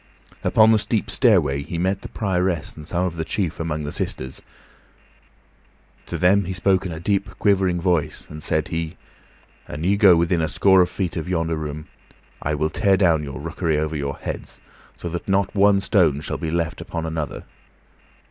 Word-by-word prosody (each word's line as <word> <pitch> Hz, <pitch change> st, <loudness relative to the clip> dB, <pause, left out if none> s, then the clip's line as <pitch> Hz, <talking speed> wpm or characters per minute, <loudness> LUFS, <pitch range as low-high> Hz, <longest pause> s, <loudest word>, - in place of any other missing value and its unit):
Upon 110 Hz, 0 st, +5 dB
the 110 Hz, -, +4 dB
steep 105 Hz, -1 st, -1 dB
stairway 90 Hz, -, +3 dB
he 80 Hz, +4 st, -5 dB
met 95 Hz, +3 st, 0 dB
the -, -, -8 dB
Prioress 90 Hz, -5 st, -1 dB
and 75 Hz, -1 st, -10 dB
some 90 Hz, +2 st, 0 dB
of 85 Hz, -2 st, -4 dB
the 80 Hz, -, -1 dB
chief 85 Hz, 0 st, -2 dB
among 80 Hz, -2 st, -2 dB
the 75 Hz, -, -4 dB
sisters. 65 Hz, +1 st, -4 dB, 1.7 s
To -, -, -4 dB
them 95 Hz, +2 st, +3 dB
he 95 Hz, -, -3 dB
spoke 95 Hz, 0 st, +1 dB
in -, -, -6 dB
a 80 Hz, -, -6 dB
deep, 100 Hz, +3 st, 0 dB
quivering 95 Hz, -3 st, +2 dB
voice, 85 Hz, -3 st, 0 dB
and 75 Hz, 0 st, -9 dB
said -, -, 0 dB
he, 80 Hz, +1 st, -3 dB, 0.7 s
"An 75 Hz, -, -6 dB
ye 100 Hz, +3 st, +2 dB
go 100 Hz, -4 st, +7 dB
within 85 Hz, 0 st, +1 dB
a 80 Hz, -, +1 dB
score 95 Hz, -1 st, +5 dB
of 90 Hz, -, +2 dB
feet 90 Hz, -3 st, -3 dB
of 85 Hz, +2 st, -4 dB
yonder 85 Hz, -2 st, 0 dB
room, 75 Hz, 0 st, -5 dB, 0.5 s
I 75 Hz, +1 st, -1 dB
will 75 Hz, +1 st, -1 dB
tear 100 Hz, -3 st, +3 dB
down 85 Hz, -5 st, +3 dB
your 70 Hz, -3 st, -6 dB
rookery 80 Hz, +1 st, -1 dB
over 80 Hz, +1 st, -1 dB
your 70 Hz, -1 st, -3 dB
heads -, -, -6 dB, 0.4 s
so -, -, -6 dB
that 85 Hz, +1 st, -5 dB
not 95 Hz, 0 st, +1 dB
one 100 Hz, 0 st, +4 dB
stone 90 Hz, -8 st, +2 dB
shall -, -, -4 dB
be 80 Hz, -, -3 dB
left 85 Hz, 0 st, -2 dB
upon 85 Hz, -1 st, -4 dB
another. 80 Hz, -2 st, -4 dB
85 Hz, 190 wpm, -22 LUFS, 80-95 Hz, 1.7 s, go